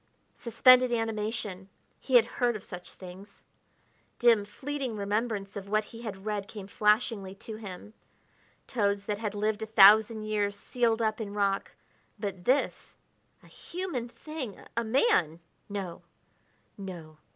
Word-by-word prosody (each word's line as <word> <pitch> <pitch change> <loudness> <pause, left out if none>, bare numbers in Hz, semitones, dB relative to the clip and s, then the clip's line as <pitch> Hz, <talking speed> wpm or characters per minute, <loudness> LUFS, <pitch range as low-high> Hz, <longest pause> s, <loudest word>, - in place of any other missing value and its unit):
Suspended 255 +2 +5
animation. 215 -4 -2 0.3
He 260 - -1
had 235 -2 +8
heard 240 0 0
of 210 - -7
such 180 0 -8
things. 190 +2 -13 0.7
Dim, 230 -4 +4
fleeting 265 +2 -4
remembrance 205 0 -2
of 200 -1 -7
what 215 +1 +2
he 230 +2 -12
had 200 -4 -7
read 205 -2 -2
came 205 -3 -8
flashingly 210 -1 +1
to 215 +1 -8
him 210 0 -9 0.7
toads 200 -4 0
that 205 0 -2
had 210 -2 -3
lived 210 +1 -1
a 220 - -3
thousand 215 +1 +7
years 205 -1 -1
sealed 230 +1 0
up 215 +1 0
in 205 -1 -5
rock 200 -1 0 0.4
but 195 -4 -5
this, 265 +3 0 0.5
a - - -17
human 340 -10 -5
thing, 280 -5 -7 0.2
a 235 - +1
man! 220 - +2 0.3
no, 195 -4 -5 0.8
no! 170 -5 -8
215 Hz, 140 wpm, -29 LUFS, 200-230 Hz, 0.8 s, had